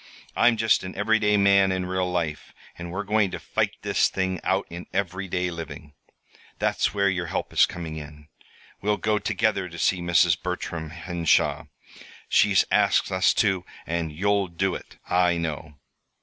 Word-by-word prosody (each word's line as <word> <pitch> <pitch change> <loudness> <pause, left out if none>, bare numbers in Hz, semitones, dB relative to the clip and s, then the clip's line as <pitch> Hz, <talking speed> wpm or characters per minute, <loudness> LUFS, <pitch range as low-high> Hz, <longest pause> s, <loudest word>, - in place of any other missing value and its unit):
I'm 120 -1 +4
just 110 -1 +2
an 95 - -7
everyday 105 0 +2
man 100 -1 +4
in 95 -1 -1
real 90 0 -1
life; 85 -4 -3 0.2
and 85 0 -7
we're 95 +3 -3
going 105 0 +2
to - - -6
fight - - -1
this - - +2
thing 95 -2 -2
out 95 +1 +1
in 85 +1 -9
everyday 95 -1 -2
living. 80 -3 -8 0.6
That's - - 0
where 100 -1 +1
your 90 -2 -1
help - - -4
is - - +5
coming 80 -3 -6
in. 75 0 -10 0.5
We'll 105 +1 +1
go 105 0 0
together 105 -3 0
to 85 - -10
see 90 +2 +1
Mrs. 85 -2 +3
Bertram 80 -2 -4
Henshaw. 85 0 0 0.6
She's 100 -2 +4
asked - - +3
us 95 0 +3
to, 95 -3 +1 0.2
and 85 -1 -2
you'll 100 +4 +1
do 90 +2 -1
it, - - -9
I 90 -1 +2
know. 80 -2 -4
90 Hz, 165 wpm, -25 LUFS, 85-100 Hz, 0.6 s, is